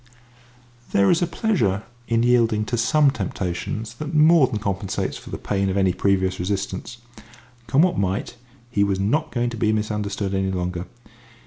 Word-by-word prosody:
There 100 0 +4
is 170 - +2
a 175 - +2
pleasure 115 - 0 0.2
in 115 0 +2
yielding 115 -3 +3
to 120 - -2
some 140 +5 +3
temptations 105 0 -4
that 155 +1 -4
more 155 -2 +6
than 110 - -3
compensates 100 -2 -2
for - - -10
the - - -4
pain 100 -1 -1
of 95 - -1
any 95 -2 +3
previous 95 -1 +1
resistance. 95 +4 -3 0.7
Come 135 +7 +4
what 180 - +1
might, 100 +4 -2 0.4
he 100 -3 +2
was 100 -1 0
not 150 +11 0
going 120 -1 -1
to 115 - -6
be 110 0 +2
misunderstood 105 -2 -2
any 95 0 0
longer. 90 -1 -3
105 Hz, 165 wpm, -23 LUFS, 95-120 Hz, 0.7 s, more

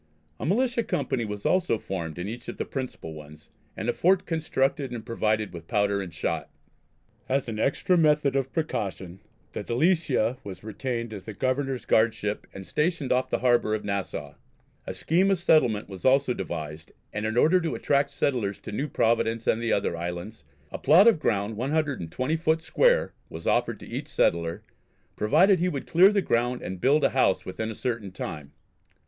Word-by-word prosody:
A - - -3
militia 235 +5 +2
company 130 - -1
was 105 -1 -6
also 180 -10 +2
formed 85 -6 -5
in 90 +2 -4
each 120 +3 -7
of - - -6
the - - -2
principal 130 - -6
ones, 75 0 -13 0.3
and - - -4
a - - +2
fort 185 +2 +3
constructed 145 -4 0
and 120 -2 -6
provided 110 -3 0
with 85 -1 -9
powder 100 -2 +1
and 90 -3 -6
shot. 80 - -3 0.8
As 135 0 0
an 110 -2 -4
extra 175 +8 +2
method 150 -3 +3
of 135 -1 0
precaution 95 - -3 0.3
the - - -5
Delicia 130 -3 +1
was 100 -1 -8
retained 115 +1 -4
as 100 -3 -8
the 110 - -7
Governor's 130 -1 -1
guardship 110 -2 +1
and 95 0 -9
stationed 150 - -1
off 130 +1 +2
the - - +1
harbour 120 -3 +3
of 105 - -5
Nassau. 100 -1 -3 0.5
A - - -3
scheme 180 +5 +2
of 195 - +3
settlement 155 - +3
was 95 -2 -10
also 130 0 +4
devised, 80 -6 -6 0.2
and 105 +1 -2
in 110 +2 -2
order 175 +8 +5
to 165 - -2
attract 140 0 +1
settlers 120 -8 -1
to - - -7
New 140 +8 -2
Providence 115 -3 +1
and 115 - +1
the 115 - 0
other 100 -4 +1
islands, 85 +3 -6 0.3
a - - -5
plot 170 +10 +6
of 225 -8 +5
ground 105 -5 -1
120 135 - -1
foot 160 0 +1
square - - +3 0.2
was 80 +1 -9
offered - - +1
to - - -10
each - - -5
settler, 85 0 0 0.5
provided 175 - +4
he 180 +2 +1
would 140 -5 -4
clear 185 +4 +6
the 200 -2 +1
ground 120 -1 0
and 95 -1 -6
build 145 +3 +3
a - - +3
house 100 -8 +2
within 110 +4 -4
a 110 - -5
certain 115 -6 -3
time. 75 -6 -6
120 Hz, 185 wpm, -26 LUFS, 100-150 Hz, 0.8 s, plot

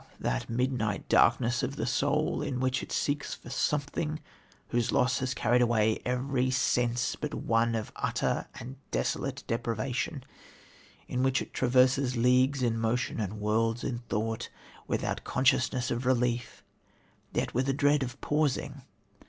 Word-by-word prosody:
that - - -2
midnight 115 -4 -1
darkness 120 0 +4
of 135 +2 -2
the - - -2
soul 140 +5 +1
in 125 - -2
which 130 0 0
it - - -8
seeks 145 0 -1
for 120 - -12
something 150 +3 -1 0.5
whose 120 -1 +1
loss 125 0 +2
has 130 0 -2
carried 125 +1 +3
away 110 -2 +2
every 125 +1 0
sense 120 -2 +1
but - - -4
one 115 0 +1
of 110 -1 -3
utter - - -1
and 130 +3 -8
desolate 60 - -2
deprivation; 125 +4 -2 0.8
in 125 - -1
which 130 0 +2
it - - -7
traverses 130 0 +3
leagues 130 +3 +3
in 115 -2 +1
motion 115 +2 -1
and 105 0 -3
worlds 115 +2 +1
in 120 -2 -2
thought 110 0 -2 0.4
without - - -2
consciousness 130 -1 +1
of 120 - -1
relief, 120 -1 0 0.7
yet - - -1
with 130 +2 +1
a - - +2
dread 145 +1 +3
of 130 0 -4
pausing. 145 -2 0
125 Hz, 145 wpm, -29 LUFS, 115-135 Hz, 0.8 s, darkness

